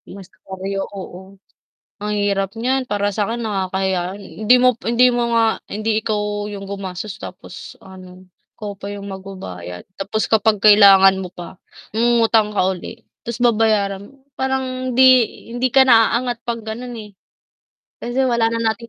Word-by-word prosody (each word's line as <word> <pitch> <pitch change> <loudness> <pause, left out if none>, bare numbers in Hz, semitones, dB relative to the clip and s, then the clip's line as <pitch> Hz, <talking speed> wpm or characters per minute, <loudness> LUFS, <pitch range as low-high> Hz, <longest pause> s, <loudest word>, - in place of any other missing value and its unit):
Mas 195 -2 -10
karyo 195 +2 -5
oo, 190 0 -10 0.7
ang 210 - -3
hirap 195 -1 0
niyan 255 +1 -1
para 205 -1 -1
sa 210 - 0
'kin 235 - -3
nakakahiya 190 -3 -2
hindi 215 +4 +2
mo 250 -1 +4
hindi 240 +2 +3
mo 235 -1 0
nga, 225 -1 +1
hindi 215 +1 -1
ikaw 210 -1 -2
yung 200 -1 -7
gumasos, 195 0 -6
tapos 180 0 -10
ano, 185 -1 -14 0.3
ikaw 205 -2 -6
pa 200 +1 -8
yung 200 0 -7
magbabayad. 185 - -8
Tapos 205 +3 -2
kapag 220 -1 +2
kailangan 195 -2 +6
mo 180 - -7
pa, 180 0 -10 0.4
mangungutang 225 -2 +3
ka 195 -3 +1
uli, 225 +6 -11 0.2
tapos 235 0 -6
babayaran 210 -3 +1
mo. - - -22 0.2
Parang 260 -1 -2
hindi 260 +2 +4 0.5
hindi 250 +1 0
ka 265 +1 +5
na 230 -1 +5
aangat 240 -2 -4
'pag 230 -2 -5
ganon 240 +2 -6
eh. 210 -2 -11 0.9
Kasi 250 +3 -1
wala 235 -2 +2
na 230 -1 0
natin 230 +1 -13
210 Hz, 155 wpm, -19 LUFS, 195-235 Hz, 0.9 s, kailangan